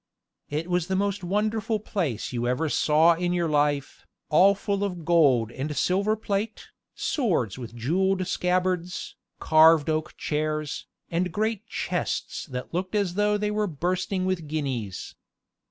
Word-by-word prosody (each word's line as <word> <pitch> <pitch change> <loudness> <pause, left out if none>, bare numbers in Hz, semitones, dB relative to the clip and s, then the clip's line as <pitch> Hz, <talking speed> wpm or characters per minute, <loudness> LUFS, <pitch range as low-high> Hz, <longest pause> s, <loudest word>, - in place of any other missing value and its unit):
It 155 +3 -2
was 180 -2 0
the 190 - 0
most 200 0 -1
wonderful 215 +3 0
place 160 - -3
you 120 0 -1
ever 150 +6 0
saw 160 +3 +4
in 175 +1 -1
your 175 -1 +1
life, 145 -2 0 0.2
all 190 +6 +6
full 200 0 -2
of 180 -5 -4
gold 140 -10 +4
and 145 +4 -4
silver 200 +4 +2
plate, 210 0 -3 0.3
swords 170 - 0
with 120 -1 -8
jeweled 185 +10 +1
scabbards, 180 -1 -1 0.2
carved 160 -1 +5
oak 155 0 -3
chairs, 155 -1 -2 0.2
and 175 +1 0
great 220 +3 -1
chests - - -3
that 125 0 -6
looked 185 +4 -2
as 200 -4 +1
though 210 +2 +2
they 210 0 -1
were 210 0 0
bursting 185 +3 -1
with 185 -4 -1
guineas. 130 -10 -3
175 Hz, 145 wpm, -26 LUFS, 150-195 Hz, 0.3 s, all